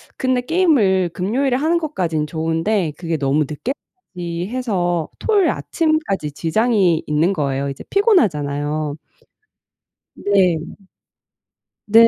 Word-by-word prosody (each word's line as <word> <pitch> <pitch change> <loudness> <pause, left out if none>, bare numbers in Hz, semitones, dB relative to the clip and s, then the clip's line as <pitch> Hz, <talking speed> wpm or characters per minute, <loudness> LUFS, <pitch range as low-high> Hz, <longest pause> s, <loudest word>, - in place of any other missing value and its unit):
근데 255 -1 0
게임을 245 - +2
금요일에 245 +10 0
하는 320 +5 +1
것까지는 170 - -2
좋은데 165 +3 0
그게 165 -2 -2
너무 145 +1 +1
늦게까지 180 - -6
해서 180 -10 -1
토요일 415 -4 +2
아침까지 310 - -1
지장이 185 0 +2
있는 160 +6 +2
거예요. 140 -3 -1
이제 135 - -7
피곤하잖아요. 150 - +1 1.2
네. 185 -5 +2 1.3
네. 230 +2 +8
185 Hz, 265 characters per minute, -20 LUFS, 155-255 Hz, 1.3 s, 네